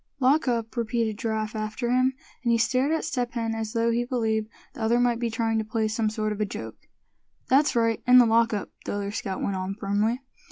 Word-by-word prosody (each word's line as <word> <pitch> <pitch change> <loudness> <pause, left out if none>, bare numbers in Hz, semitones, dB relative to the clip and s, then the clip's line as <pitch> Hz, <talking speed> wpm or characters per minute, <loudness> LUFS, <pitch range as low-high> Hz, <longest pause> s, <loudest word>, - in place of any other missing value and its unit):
"Lock 275 +3 +3
up!" 230 -2 -1
repeated 230 -2 -1
Giraffe 220 -2 -2
after 220 +3 -2
him, 255 +1 +2 0.3
and 235 - +1
he 230 - +4
stared 255 +5 +2
at 320 - 0
Step 245 -6 -2
Hen 230 -2 -1
as 220 0 -4
though 230 0 +2
he 235 +1 +1
believed 220 -3 -1 0.2
the 270 - -9
other 230 +2 +3
might 240 -1 +2
be 235 -1 -1
trying 225 0 0
to - - -1
play 220 0 -1
some 220 0 0
sort 215 0 -2
of 210 0 -3
a - - +4
joke. 110 - -8 0.6
"That's 280 +2 +4
right, 230 -1 +2
in 250 0 +8
the 245 - +8
lock 230 0 +3
up," 205 -3 -3
the - - -3
other 200 0 -3
scout 195 -3 -4
went 195 -1 -1
on, 185 +1 -3
firmly. 210 +4 0
230 Hz, 230 wpm, -26 LUFS, 215-240 Hz, 0.6 s, in